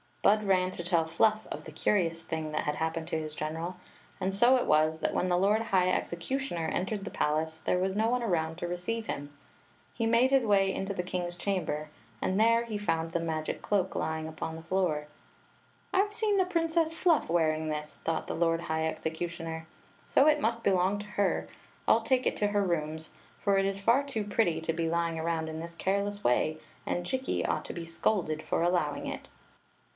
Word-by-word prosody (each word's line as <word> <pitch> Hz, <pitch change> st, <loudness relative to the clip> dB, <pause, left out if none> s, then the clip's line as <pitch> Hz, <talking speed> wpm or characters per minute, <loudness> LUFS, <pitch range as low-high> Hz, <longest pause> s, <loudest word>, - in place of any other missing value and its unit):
Bud 215 Hz, +1 st, +5 dB
ran 185 Hz, -2 st, +3 dB
to 175 Hz, -, -6 dB
tell 170 Hz, -2 st, +2 dB
Fluff 215 Hz, +6 st, +2 dB
of -, -, -5 dB
the -, -, -8 dB
curious 165 Hz, -5 st, +1 dB
thing 160 Hz, -2 st, -3 dB
that -, -, -1 dB
had 150 Hz, -, 0 dB
happened 160 Hz, 0 st, -2 dB
to 160 Hz, -, -1 dB
his 155 Hz, -1 st, -6 dB
general; 165 Hz, +4 st, -4 dB, 0.4 s
and 190 Hz, 0 st, -1 dB
so 240 Hz, +6 st, +5 dB
it 250 Hz, -, +1 dB
was 155 Hz, +1 st, +3 dB
that -, -, -1 dB
when 185 Hz, -, +1 dB
the 175 Hz, -1 st, +2 dB
lord 205 Hz, +4 st, +3 dB
high 185 Hz, -5 st, +2 dB
executioner 175 Hz, 0 st, -2 dB
entered 195 Hz, +5 st, -2 dB
the -, -, -5 dB
palace 160 Hz, +1 st, 0 dB
there -, -, +1 dB
was 190 Hz, +1 st, 0 dB
no 220 Hz, +2 st, +2 dB
one 250 Hz, +1 st, +1 dB
around 165 Hz, -6 st, 0 dB
to 175 Hz, -, -3 dB
receive 180 Hz, +6 st, -3 dB
him. 145 Hz, 0 st, -5 dB, 0.6 s
He 230 Hz, -, -1 dB
made 235 Hz, +3 st, +4 dB
his 270 Hz, -3 st, +4 dB
way 195 Hz, -2 st, +3 dB
into 195 Hz, +1 st, -3 dB
the 180 Hz, -, -2 dB
kings 175 Hz, -1 st, -3 dB
chamber, 175 Hz, -5 st, -2 dB, 0.3 s
and 190 Hz, +2 st, 0 dB
there 230 Hz, +1 st, +4 dB
he 215 Hz, -3 st, -4 dB
found 165 Hz, -5 st, -1 dB
the 170 Hz, -, 0 dB
magic 160 Hz, -2 st, -3 dB
cloak 190 Hz, -2 st, 0 dB
lying 160 Hz, 0 st, -2 dB
upon 160 Hz, 0 st, -5 dB
the 165 Hz, -, -8 dB
floor. 165 Hz, -4 st, 0 dB, 0.4 s
" -, -, -34 dB
I 390 Hz, +2 st, +4 dB
Ve 415 Hz, -, -14 dB
seen 425 Hz, -2 st, +1 dB
the 375 Hz, -, +4 dB
Princess 330 Hz, -2 st, +1 dB
Fluff 330 Hz, -, +2 dB
wearing 160 Hz, -2 st, +1 dB
this," 150 Hz, 0 st, -4 dB
thought 165 Hz, -1 st, -1 dB
the -, -, -3 dB
lord 165 Hz, 0 st, +2 dB
high 160 Hz, -1 st, -1 dB
executioner; 160 Hz, 0 st, -4 dB, 0.4 s
"so 275 Hz, -, +5 dB
it 300 Hz, -1 st, +4 dB
must 230 Hz, -1 st, 0 dB
belong 190 Hz, +1 st, +3 dB
to 205 Hz, -, -6 dB
h^. 205 Hz, -1 st, 0 dB, 0.4 s
I -, -, +6 dB
11 225 Hz, 0 st, +4 dB
t^e 255 Hz, 0 st, +3 dB
it -, -, +1 dB
to 205 Hz, -, +2 dB
her 205 Hz, 0 st, +1 dB
rooms, 160 Hz, -3 st, -2 dB, 0.3 s
for 200 Hz, -1 st, +2 dB
it 195 Hz, -, +3 dB
is 195 Hz, 0 st, -1 dB
ht 245 Hz, +7 st, +3 dB
too 225 Hz, -6 st, -2 dB
pretty 185 Hz, -6 st, +1 dB
to 165 Hz, 0 st, -1 dB
be 165 Hz, 0 st, -1 dB
lying 170 Hz, -1 st, 0 dB
around 160 Hz, 0 st, -1 dB
in 160 Hz, 0 st, -5 dB
tliis 170 Hz, +1 st, -8 dB
careless 200 Hz, +2 st, -1 dB
way, 155 Hz, +6 st, +2 dB, 0.3 s
and 175 Hz, -, -1 dB
Jikki 260 Hz, +7 st, -1 dB
ought -, -, -1 dB
to -, -, -5 dB
be 170 Hz, -1 st, -5 dB
scolded 165 Hz, -2 st, 0 dB
for 165 Hz, -, 0 dB
allowing 170 Hz, -5 st, +1 dB
it." -, -, -6 dB
180 Hz, 210 wpm, -30 LUFS, 160-210 Hz, 0.6 s, I